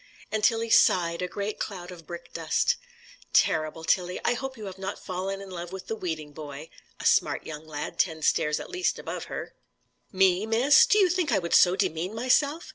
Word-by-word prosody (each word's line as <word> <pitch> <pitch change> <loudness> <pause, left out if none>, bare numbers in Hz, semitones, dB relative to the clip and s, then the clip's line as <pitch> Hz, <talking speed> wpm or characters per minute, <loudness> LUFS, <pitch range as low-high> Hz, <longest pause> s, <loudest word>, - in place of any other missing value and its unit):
And 215 -1 -1
Tilly 225 0 +2
sighed 170 -2 +4
a 180 - -1
great 200 +3 -4
cloud 180 -3 -5
of 165 -4 -12
brick 170 0 -9
dust. 165 -2 +1 0.6
"Terrible, 155 0 +2
Tilly: 180 +2 0
I - - +3
hope 265 +1 -5
you 215 - -8
have 190 -1 -8
not 190 0 -4
fallen 190 +2 -4
in 195 -1 -10
love 175 -1 -6
with 190 -1 -7
the 225 - -3
weeding 160 -7 -5
boy!" 150 0 -9 0.3
a - - -7
smart - - +2
young 155 0 -8
lad, 150 -1 -6
ten 160 -3 0
stairs 150 0 +2
at - - -9
least 365 0 0
above - - -6
her. - - -6 0.6
"Me, 190 +1 +3
miss? 275 - +5
Do 420 - +4
you 395 -3 +6
think 355 -5 0
I - - +3
would 170 -2 -2
so 180 0 +6
demean 175 +3 -1
myself?" 285 +7 +1
185 Hz, 205 wpm, -27 LUFS, 165-225 Hz, 0.6 s, you